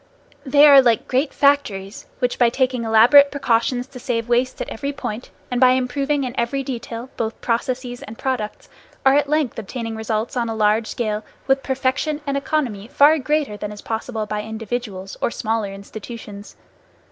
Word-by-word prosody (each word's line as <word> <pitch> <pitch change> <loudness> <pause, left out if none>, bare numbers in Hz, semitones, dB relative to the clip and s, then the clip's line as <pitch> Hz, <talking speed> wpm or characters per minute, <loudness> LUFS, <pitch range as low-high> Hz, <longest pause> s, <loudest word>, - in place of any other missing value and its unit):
They 285 +1 +5
are 280 -2 +9
like 235 -4 +2
great 265 +3 +1
factories, 220 -9 0
which 250 -1 -1
by 240 -2 +5
taking 255 -1 0
elaborate 240 +6 +7
precautions 245 -2 0
to 260 -1 -12
save 235 -2 -2
waste 245 +2 +1
at - - -3
every 280 +5 -4
point, 250 -4 -6 0.2
and 245 0 -1
by 255 -1 +7
improving 275 +3 0
in 250 -2 -4
every 270 +4 -1
detail 240 -1 -6
both 225 0 -3
processes 245 +1 -2
and 220 +2 -9
products, 250 -6 -3 0.4
are 265 - +6
at 290 0 +2
length 300 -6 0
obtaining 225 +1 -5
results 220 +1 -2
on 235 -2 -1
a 225 - -3
large 215 +1 +2
scale 215 -2 -2 0.2
with 270 0 +3
a - - -20
perfection 270 +3 -1
and 280 -1 -1
economy 275 -8 -2
far 290 +4 +5
greater 290 -5 -1
than 210 0 -5
is 210 - -10
possible 225 0 -3
by 210 0 -3
individuals, 220 -3 -5
or - - +1
smaller 220 -3 -2
institutions. 205 +1 -9
245 Hz, 175 wpm, -21 LUFS, 220-270 Hz, 0.4 s, are